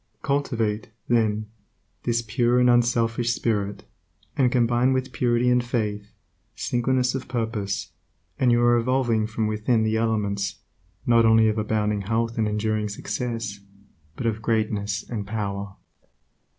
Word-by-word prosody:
Cultivate, 115 -8 -1 0.2
then, 110 -3 +1 0.6
this 120 0 +1
pure 120 +2 +2
and 125 0 +5
unselfish 120 0 +2
spirit, 105 -4 -1 0.5
and 130 -4 +3
combine 120 +1 +3
with 130 0 -1
purity 120 -1 +1
and 125 0 +3
faith, 105 -4 -2 0.4
singleness 125 +1 0
of 130 -1 -4
purpose, 110 -5 -3 0.5
and 125 -2 +4
you 120 0 +3
are 120 0 +5
evolving 120 -3 +1
from 110 0 -2
within 110 +2 +1
the 110 0 +1
elements, 105 -3 -1 0.5
not 115 -1 +5
only 110 0 +5
of 110 0 -1
abounding 105 -1 0
health 115 +3 -1
and 110 - +2
enduring 105 0 -1
success, 115 -1 -4 0.6
but 125 - -5
of 110 -1 -1
greatness 105 -2 -1
and 105 -4 -4
power. 100 -2 -4
115 Hz, 135 wpm, -24 LUFS, 105-120 Hz, 0.6 s, and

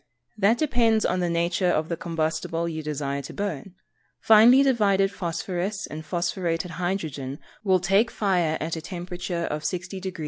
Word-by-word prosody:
_ - - -43 0.3
That 210 +3 +3
depends 235 -7 +2
upon 185 - +1
the 175 -1 0
nature 170 +2 +1
of 155 -2 +1
the 170 - -2
combustible 165 0 -2
you 160 -1 -4
desire 140 -2 -3
to 140 - -9
burn. 195 -3 -4 0.4
Finely 230 +5 +7
divided 200 -7 +3
phosphorous 185 +3 -3
and 155 +1 -7
phosphorated 170 +1 -2
hydrogen 155 -7 -3 0.3
will 190 -3 +3
take 195 +6 +3
fire 180 -8 +1
at 160 +2 -3
a 160 - -5
temperature 175 0 -4
of 150 - -3
60 180 +3 -3
deg. 185 -1 -6
175 Hz, 165 wpm, -25 LUFS, 165-195 Hz, 0.4 s, Finely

